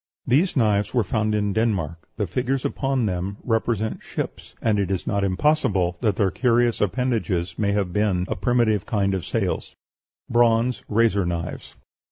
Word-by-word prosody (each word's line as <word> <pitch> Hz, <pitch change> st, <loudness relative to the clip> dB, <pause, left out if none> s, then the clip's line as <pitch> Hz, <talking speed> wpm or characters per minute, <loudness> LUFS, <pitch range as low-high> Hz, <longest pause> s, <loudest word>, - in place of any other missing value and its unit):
These 155 Hz, +10 st, +2 dB
knives 105 Hz, -2 st, +2 dB
were 120 Hz, -, +4 dB
found 110 Hz, +1 st, 0 dB
in 105 Hz, -1 st, 0 dB
Denmark. 95 Hz, -8 st, -1 dB
The 105 Hz, -, 0 dB
figures 125 Hz, +8 st, -1 dB
upon 135 Hz, -3 st, 0 dB
them 95 Hz, +1 st, -2 dB
represent 115 Hz, -2 st, -1 dB
ships, -, -, -6 dB
and 105 Hz, -2 st, +1 dB
it 100 Hz, -2 st, 0 dB
is 95 Hz, -2 st, -2 dB
not 100 Hz, 0 st, 0 dB
impossible 95 Hz, -, +1 dB
that 105 Hz, -5 st, +1 dB
their 95 Hz, -2 st, +1 dB
curious 120 Hz, -2 st, +2 dB
appendages 105 Hz, -6 st, -1 dB
may 100 Hz, -2 st, +1 dB
have 100 Hz, -4 st, -1 dB
been 100 Hz, -3 st, +1 dB
a 110 Hz, -, -2 dB
primitive 110 Hz, 0 st, +1 dB
kind 100 Hz, -2 st, +1 dB
of 95 Hz, -3 st, -2 dB
sails. -, -, -2 dB, 0.5 s
BRONZE 120 Hz, -1 st, +2 dB
RAZOR 105 Hz, -4 st, +2 dB
KNIVES. 85 Hz, -1 st, -5 dB
105 Hz, 160 wpm, -23 LUFS, 95-120 Hz, 0.5 s, were